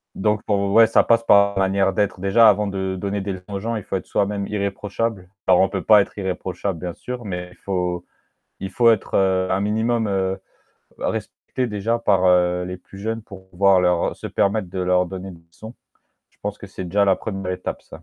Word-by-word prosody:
Donc 105 +1 0
pour 100 -1 0
ouais, 115 0 +8
ça - - +3
passe 115 0 +3
par 100 -2 +5
la 95 - +1
manière 95 0 +1
d'être 100 -2 0
déjà 100 +5 +5
avant 105 0 +3
de 95 -1 -3
donner 100 0 -2
des 100 0 -3
leçons 95 +2 -8
aux 100 - -2
gens, 115 +3 -3
il 105 - -4
faut - - -4
être 95 - -3
soi-même 100 0 -1
irréprochable. 100 0 -3 0.2
Alors, 90 -1 +5
on 95 - +3
peut 95 -1 -3
pas 105 -1 +7
être - - -5
irréprochable 95 -1 -3
bien 90 0 -5
sûr, 125 -2 -7
mais 90 -2 -5
il - - -17
faut 90 -2 -3 0.5
il 95 - -5
faut 115 +4 +4
être, 110 - -1
heu, 95 -1 +2
un 95 +1 +1
minimum, 110 +2 0
heu, 95 0 -1 0.6
respecté 130 - -3
déjà 105 +2 -1
par, 100 -5 +2
heu, 90 0 +3
les 90 0 -6
plus 95 +1 -14
jeunes 110 +1 -3
pour 95 -3 -13
pouvoir 95 +1 +4
leur 90 -1 +1
se - - -7
permettre 100 -2 0
de 95 - -5
leur 90 0 +2
donner 95 +1 -7
des 85 - -14
leçons. 110 +7 -11 0.6
Je - - -35
pense 105 0 -4
que - - -9
c'est 95 -1 -7
déjà 100 +3 +2
la 95 -1 +4
1re 95 -3 -4
étape 90 - -5
ça. - - -13
100 Hz, 220 wpm, -22 LUFS, 95-105 Hz, 0.6 s, ouais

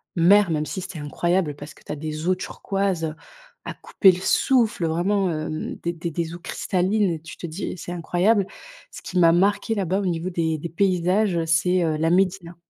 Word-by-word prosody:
mer, 190 +3 +5
même 155 -2 0
si 190 - -5
c'était 185 -3 -7
incroyable 170 +2 -1
parce 145 +1 -9
que - - -21
tu - - -8
as 150 - -4
des 155 +1 -5
eaux 185 - +3
turquoises, 195 -1 -2
heu, 155 -1 -3 0.5
à - - -5
couper 190 -3 +3
le 180 - -6
souffle 225 -3 +2
vraiment, 185 +4 +1
hem, 155 -1 -4
des 170 - 0
des 170 -1 -4
eaux 175 - -8
cristallines 190 +4 0
et 165 - -3
tu 165 +1 -10
te - - -8
dis: 170 +4 -5
«C'est 175 - -7
incroyable». 180 +4 +1 0.4
Ce - - -10
qui 180 - -2
m'a 165 -1 +6
marqué 205 +5 +2
là-bas, 190 -1 0
au 200 - -2
niveau 175 0 -1
des 165 -3 -1
des 170 +3 -6
paysages, 180 +1 +1
c'est, 175 +3 +2
heu, 160 -2 0
la 160 +1 +1
médina. 180 -1 +1
175 Hz, 205 wpm, -23 LUFS, 165-190 Hz, 0.5 s, m'a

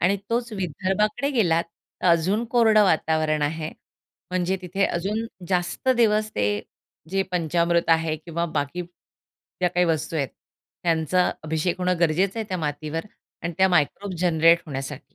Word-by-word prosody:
आणि 190 +3 +3
तोच 235 0 -1
विदर्भाकडे 200 - -1
गेलात 175 - +2 0.4
तर - - +1
अजून 180 +6 +3
कोरडं 220 -3 +5
वातावरण 155 -3 +1
आहे, 155 +2 -2 0.6
म्हणजे 185 +1 0
तिथे 190 +2 0
अजून 205 +6 -2 0.2
जास्त 180 +6 -1
दिवस 215 -2 +3
ते 100 - +1 0.6
जे 195 +1 +1
पंचामृत 170 0 +1
आहे 160 -1 +2
किंवा 170 +2 -3
बाकी 145 +5 -2
ज्या 180 +1 -7
काही 180 0 +2
वस्तू 160 0 -1
आहेत, 140 -4 0 0.5
त्यांचा 170 +2 +2
अभिषेक 160 +3 -1
होणं 180 -1 0
गरजेचं 180 +6 +2
आहे 220 -2 -4
त्या 185 - -2
मातीवर 155 +2 -3 0.4
आणि 170 +1 -2
त्या 190 0 +5
मायक्रोब्स 180 +3 0
जनरेट 170 -1 +4
होण्यासाठी. 135 -1 -6
175 Hz, 145 wpm, -24 LUFS, 160-195 Hz, 0.6 s, कोरडं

